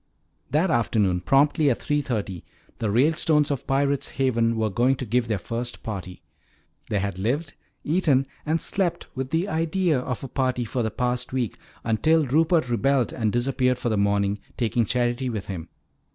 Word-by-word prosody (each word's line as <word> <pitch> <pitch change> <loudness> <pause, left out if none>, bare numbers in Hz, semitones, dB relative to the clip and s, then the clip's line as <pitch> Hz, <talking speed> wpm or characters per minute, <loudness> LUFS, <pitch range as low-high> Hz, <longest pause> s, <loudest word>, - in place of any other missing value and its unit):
That 160 +5 +2
afternoon 105 - +1
promptly 145 - +3
at 125 - 0
three 145 0 0
thirty 105 - -3 0.4
the 110 - -1
Ralestones 150 - +3
of 140 - -3
Pirate's 140 0 +1
Haven 115 -4 +1
were 110 -1 0
going 125 +7 +2
to 130 - -5
give 120 +2 +1
their 110 -2 0
first 115 +6 -5
party. 95 -4 -6 0.7
They 105 - 0
had 100 -1 -2
lived, 145 - -1 0.3
eaten, 150 -5 +2 0.2
and 160 +2 0
slept 185 -1 -1
with 130 0 -4
the 165 +6 0
idea 165 -2 +1
of 125 0 -4
a - - -4
party 130 -2 -1
for 125 +3 -2
the 110 - 0
past 125 +1 -2
week 125 -4 -2 0.2
until 155 +8 +2
Rupert 160 +2 +2
rebelled 130 +1 +1
and 110 -3 0
disappeared 125 +1 +1
for 120 - -2
the 110 - +1
morning, 100 0 +1 0.2
taking 120 -1 +1
Charity 120 +3 0
with 110 -5 -4
him. 85 -4 -6
125 Hz, 170 wpm, -25 LUFS, 110-145 Hz, 0.7 s, promptly